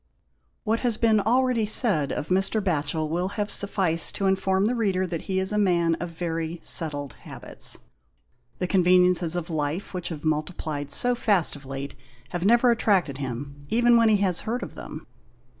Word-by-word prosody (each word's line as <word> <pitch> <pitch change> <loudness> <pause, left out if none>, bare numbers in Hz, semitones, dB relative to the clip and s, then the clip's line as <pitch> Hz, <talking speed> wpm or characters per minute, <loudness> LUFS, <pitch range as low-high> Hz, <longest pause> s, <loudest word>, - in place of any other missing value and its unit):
What 225 +2 0
has 240 -4 0
been 220 -2 +3
already 235 +1 +1
said 200 - +3
of 150 - -4
Mr. 195 +4 +1
Batchel 155 -4 -1
will 175 +4 -2
have 210 0 -1
sufficed 185 -5 +2
to 195 - -2
inform 190 0 +1
the 235 - +1
reader 195 -6 0
that 170 -3 -5
he 190 0 0
is 190 +1 0
a 210 - 0
man 170 -4 +2
of 175 - -5
very 165 0 -4
settled 145 -4 +1
habits. - - -2 0.8
The - - -2
con 185 0 +1
veniences 180 -1 +3
of 175 -1 -4
life, 155 +5 -3
which 180 -2 -4
have 160 -2 -8
multiplied 155 -2 -3
so 245 +11 +4
fast 205 -10 +1
of 140 -2 -13
late, 135 +1 -6 0.4
have 175 -1 -4
never 235 +4 +4
attracted 190 - +1
him, 140 +2 -6
even 240 +1 +3
when 230 -1 +4
he 215 - +4
has 190 -4 0
heard 240 +3 -3
of - - -8
them. 155 - -9
180 Hz, 180 wpm, -24 LUFS, 160-210 Hz, 0.8 s, so